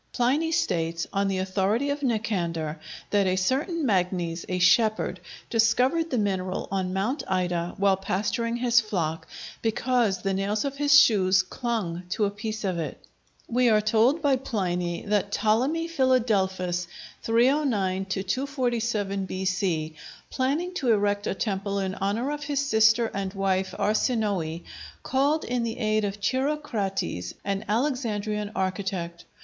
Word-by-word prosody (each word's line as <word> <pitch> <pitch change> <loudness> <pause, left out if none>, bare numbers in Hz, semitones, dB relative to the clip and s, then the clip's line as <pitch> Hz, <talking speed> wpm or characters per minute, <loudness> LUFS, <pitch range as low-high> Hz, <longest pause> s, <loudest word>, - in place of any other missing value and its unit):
Pliny 280 +7 +1
states, 165 - 0
on 200 0 +1
the 195 -1 -1
authority 195 +8 0
of 285 +1 -3
Nicander, 175 - -1 0.3
that 200 -2 +3
a 185 - +2
certain 280 - 0
Magnes, 180 -5 0
a 180 - 0
shepherd, 215 +4 +3 0.3
discovered 250 +9 +2
the 255 - -1
mineral 190 -3 -1
on 190 -2 -1
Mount 205 +10 -1
Ida, 175 -2 -1
while 195 -1 +3
pasturing 215 +5 -1
his 240 -1 +4
flock, 170 -7 -3 0.3
because 230 -3 +1
the 195 -1 0
nails 200 +5 -1
of 275 0 -3
his 290 0 +7
shoes 190 -7 +4
clung 185 -5 -3
to 210 +3 +1
a 200 - -1
piece 215 +1 -5
of 185 -3 -1
it. 160 - -4 0.5
We 245 +1 +3
are 215 -1 +5
told 230 +9 +2
by 275 -2 +3
Pliny 180 -8 -2
that 205 -1 0
Ptolemy 260 +12 +1
Philadelphus 200 - +1 0.3
(309 230 -6 +2
247 220 -1 -1
B.C.), 180 -4 -1 0.4
planning 295 +8 -1
to 270 -10 +1
erect 205 -1 +1
a - - -1
temple 200 -1 -2
in 190 -1 -1
honor 210 +8 -1
of 295 -1 -4
his 285 -1 0
sister 220 -1 +4
and 195 0 -3
wife 190 -1 0
Arsinoë, 205 -7 0 0.4
called 285 +4 +1
in 245 -1 -1
the 230 -1 -3
aid 215 -2 +1
of 200 0 -3
Chirocrates, 220 - -2
an 200 +1 -1
Alexandrian 215 -4 -1
architect. 185 -3 -3
210 Hz, 140 wpm, -26 LUFS, 190-245 Hz, 0.5 s, his